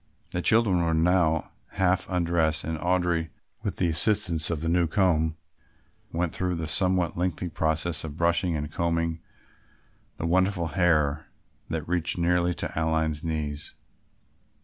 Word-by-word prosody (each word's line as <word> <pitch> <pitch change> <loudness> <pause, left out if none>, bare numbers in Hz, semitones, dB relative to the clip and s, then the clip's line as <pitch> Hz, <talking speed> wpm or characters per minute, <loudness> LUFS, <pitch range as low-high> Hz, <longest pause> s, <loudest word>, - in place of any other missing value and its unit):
The 90 - -1
children 105 -4 +4
were 80 -1 +1
by - - +2
now 80 -2 +2 0.2
half 95 0 +1
undressed 85 -3 +1
and 80 +1 -3
Audry 90 -2 0 0.3
with - - -3
the 90 - +1
assistance 80 -2 +2
of 80 -3 -2
the 80 - -2
new 85 0 +2
comb 80 -3 +1 0.7
went 85 -1 -1
through 90 -1 -1
the 80 -1 -3
somewhat 90 +2 +1
lengthy 90 0 -1
process 80 0 -1
of 75 -1 -7
brushing 85 0 +1
and 75 0 -4
combing 85 0 -1 1.0
the - - -3
wonderful 90 0 +1
hair 75 -3 +1 0.4
that 80 -2 -3
reached 85 0 0
nearly 90 0 +1
to - - -3
Aline's 80 -1 0
knees. 75 -2 -3
85 Hz, 145 wpm, -26 LUFS, 80-90 Hz, 1.0 s, children